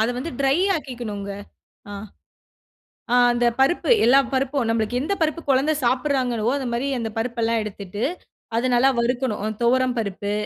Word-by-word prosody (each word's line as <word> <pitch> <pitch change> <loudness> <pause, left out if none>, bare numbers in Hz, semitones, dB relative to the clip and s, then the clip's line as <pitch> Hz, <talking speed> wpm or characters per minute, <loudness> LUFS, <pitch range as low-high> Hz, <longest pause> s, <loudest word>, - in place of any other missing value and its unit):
அத 220 - +2
வந்து 320 +6 -4
ட்ரை 270 +2 +3 0.2
ஆக்கிக்கணும்ங்க. 225 -8 -6 0.6
ஆ. - - -7 1.2
ஆ - - +5 0.2
அந்த 240 0 +1
பருப்பு 270 - +2 0.2
எல்லா 265 +3 +6
பருப்பும் 265 -1 0
நம்ளுக்கு 225 +2 0
எந்த 310 +8 -1
பருப்பு 320 +1 0
குழந்தை 275 +3 +3
சாப்பிடுறாங்களோ, 250 -3 0
அந்த 265 -3 -3
மாரி 245 +4 -1
அந்த 225 -1 -3
பருப்பு 235 +1 -3
எல்லாம் 225 0 +1
எடுத்துட்டு 205 0 -6 0.5
அத 235 +3 +1
நல்லா 255 +3 +5
வறுக்கணும். 240 -3 -1 0.2
துவரம் 255 +1 +2
பருப்பு, 205 -2 -3
245 Hz, 150 wpm, -22 LUFS, 225-270 Hz, 1.2 s, எல்லா